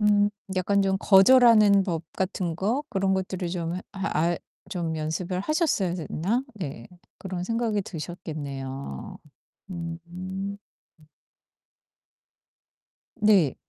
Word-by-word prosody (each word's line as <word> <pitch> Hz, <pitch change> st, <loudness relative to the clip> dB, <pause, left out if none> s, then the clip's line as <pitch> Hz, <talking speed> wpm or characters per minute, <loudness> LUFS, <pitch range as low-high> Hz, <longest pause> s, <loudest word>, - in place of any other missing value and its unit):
음. 205 Hz, -1 st, +4 dB, 0.3 s
약간 200 Hz, +2 st, +2 dB
좀 190 Hz, 0 st, +2 dB
거절하는 210 Hz, 0 st, +7 dB
법 170 Hz, -4 st, -2 dB
같은 185 Hz, -3 st, -1 dB
거 225 Hz, +10 st, 0 dB
그런 195 Hz, -5 st, +1 dB
것들을 185 Hz, -1 st, -2 dB
좀 170 Hz, -1 st, -3 dB
해 -, -, -4 dB
하 195 Hz, -1 st, -2 dB
알 170 Hz, +2 st, +2 dB, 0.3 s
좀 170 Hz, -4 st, -2 dB
연습을 170 Hz, +4 st, -2 dB
하셨어야 305 Hz, -, +1 dB
됐나? 185 Hz, -, -1 dB
네. 140 Hz, -, -6 dB, 0.3 s
그런 185 Hz, -2 st, -4 dB
생각이 225 Hz, 0 st, 0 dB
드셨겠네요. 145 Hz, -, -6 dB, 0.5 s
음 170 Hz, -2 st, -5 dB
음. 190 Hz, +3 st, -5 dB, 2.6 s
네. 195 Hz, -10 st, +5 dB
185 Hz, 195 characters per minute, -26 LUFS, 165-200 Hz, 2.6 s, 거절하는